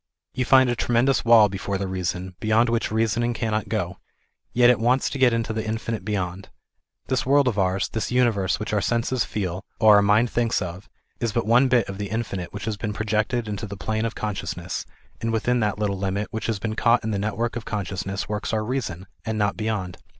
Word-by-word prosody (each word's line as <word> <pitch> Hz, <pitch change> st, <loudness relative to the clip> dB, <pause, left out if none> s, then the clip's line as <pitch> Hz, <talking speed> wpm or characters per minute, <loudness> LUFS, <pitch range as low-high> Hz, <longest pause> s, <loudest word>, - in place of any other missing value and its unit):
You 125 Hz, -, -1 dB
find 130 Hz, 0 st, +6 dB
a 120 Hz, -, 0 dB
tremendous 120 Hz, +3 st, +2 dB
wall 115 Hz, -2 st, +7 dB
before 100 Hz, 0 st, -3 dB
the 100 Hz, -, -3 dB
reason, 90 Hz, 0 st, -3 dB
beyond 110 Hz, +2 st, +3 dB
which 115 Hz, -2 st, 0 dB
reasoning 115 Hz, +2 st, +1 dB
cannot 110 Hz, -2 st, -2 dB
go; 90 Hz, -6 st, -2 dB, 0.5 s
yet 120 Hz, 0 st, +6 dB
it 125 Hz, -, +1 dB
wants 125 Hz, +3 st, +2 dB
to 140 Hz, -, -4 dB
get 130 Hz, -2 st, +5 dB
into 115 Hz, -1 st, -1 dB
the 110 Hz, 0 st, -2 dB
infinite 110 Hz, 0 st, -3 dB
beyond. 95 Hz, -3 st, -3 dB, 0.6 s
This 130 Hz, -, 0 dB
world 140 Hz, +1 st, +4 dB
of 110 Hz, -5 st, 0 dB
ours, 95 Hz, 0 st, +1 dB
this 110 Hz, -, -3 dB
universe 115 Hz, -7 st, +2 dB
which 110 Hz, -, -4 dB
our 105 Hz, -, +2 dB
senses 120 Hz, +4 st, 0 dB
feel, 95 Hz, -3 st, -3 dB, 0.2 s
or 105 Hz, -2 st, +7 dB
our -, -, +6 dB
mind 105 Hz, +4 st, +3 dB
thinks 120 Hz, -1 st, +1 dB
of, 90 Hz, +1 st, -6 dB, 0.3 s
is 115 Hz, -2 st, -1 dB
but 115 Hz, -, 0 dB
one 120 Hz, +4 st, +5 dB
bit 120 Hz, -4 st, +3 dB
of 95 Hz, 0 st, -7 dB
the 100 Hz, -1 st, -3 dB
infinite 100 Hz, -5 st, -3 dB
which 105 Hz, -, -6 dB
has 110 Hz, -2 st, -2 dB
been 105 Hz, +1 st, -3 dB
projected 110 Hz, +2 st, -1 dB
into 105 Hz, +1 st, -4 dB
the 100 Hz, 0 st, -7 dB
plane 110 Hz, +4 st, -1 dB
of 115 Hz, -, -3 dB
conciousness, 90 Hz, -4 st, -4 dB, 0.3 s
and 115 Hz, -, -1 dB
within 120 Hz, +2 st, +1 dB
that 105 Hz, -3 st, 0 dB
little 100 Hz, -2 st, -1 dB
limit 100 Hz, +2 st, -2 dB
which 110 Hz, -, -3 dB
has 115 Hz, -2 st, 0 dB
been 110 Hz, +2 st, -3 dB
caught 120 Hz, +1 st, +3 dB
in 110 Hz, -, -2 dB
the 100 Hz, -, -1 dB
network 110 Hz, +3 st, -2 dB
of 120 Hz, -, -4 dB
consciousness 95 Hz, -1 st, -3 dB
works 105 Hz, 0 st, -3 dB
our 110 Hz, -1 st, 0 dB
reason, 100 Hz, -8 st, -3 dB, 0.2 s
and 110 Hz, -1 st, -2 dB
not 105 Hz, -1 st, +1 dB
beyond. 105 Hz, -5 st, -3 dB
110 Hz, 215 wpm, -24 LUFS, 100-115 Hz, 0.6 s, wall